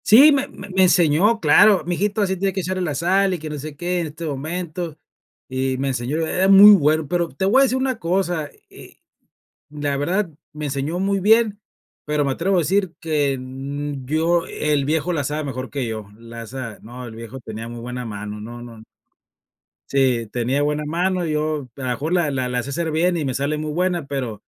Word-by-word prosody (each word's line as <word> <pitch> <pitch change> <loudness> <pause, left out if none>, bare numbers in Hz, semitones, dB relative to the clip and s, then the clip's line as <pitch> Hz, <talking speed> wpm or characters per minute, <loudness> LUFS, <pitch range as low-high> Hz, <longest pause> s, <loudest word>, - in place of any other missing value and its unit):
Sí, 270 +8 +8
me 280 -1 +1
me 200 - -11 0.2
enseñó, 180 +5 +4
claro, 210 -3 +5
mi 175 - -1
hijito, 205 +3 0
así 190 -1 0
tiene 190 +1 -1
que 190 - -2
echarle 185 +1 -2
la 155 -5 -2
sal 190 +5 +2
y - - -7
que 155 0 -6
no 150 - -5
sé 150 +1 -7
qué 175 +3 -1
en 170 - -2
este 155 +3 -8
momento, 160 +2 -4 0.5
y 130 0 -1
me 135 +1 -1
enseñó. 130 +3 -2
Era 185 +4 +1
muy 195 +2 +10
bueno, 155 -5 +3
pero, 170 +2 0
te 190 - -3
voy 240 +8 +5
a - - +7
decir 260 -1 +1
una 260 -3 -1
cosa, 175 -3 -1 0.2
eh, - - -14 0.7
la 145 -1 -2
verdad 175 +7 0 0.2
me 150 -1 -6
enseñó 140 +4 -2
muy 195 +1 +1
bien, 215 +1 +3 0.4
pero 150 -1 0
me 135 - 0
atrevo 185 +8 0
a - - +4
decir 185 +2 +1
que 150 -4 0
n 135 +2 -5
yo 165 +4 +1
el 150 -2 0
viejo 160 +4 0
la 145 -4 -1
sabe 150 +3 -2
mejor 130 -2 -5
que 135 -3 -3
yo, 110 -2 -5
la 115 0 -9
sabe, 125 -3 -7
no, 125 +3 -9
el 110 -2 -9
viejo 115 +3 -8
tenía 110 -1 -7
muy 120 0 -8
buena 125 +1 -5
mano, 105 -1 -6
no, 120 +2 -8
no 115 -2 -12 1.1
sí, 130 -4 +2
tenía 125 +4 0
buena 150 +1 -1
mano, 180 +3 0
yo, 155 -2 -1
a - - -8
lo - - -2
mejor 145 +7 -2
la 175 -5 +2
la 130 -2 -1
la 125 -1 -2
sé 140 - -7
hacer 160 +3 -2
bien 175 +3 +1
y 155 - -2
me 130 - -1
sale 140 +3 -1
muy 155 0 -3
buena, 175 -1 0
pero 125 -7 -4
150 Hz, 215 wpm, -21 LUFS, 135-180 Hz, 1.1 s, muy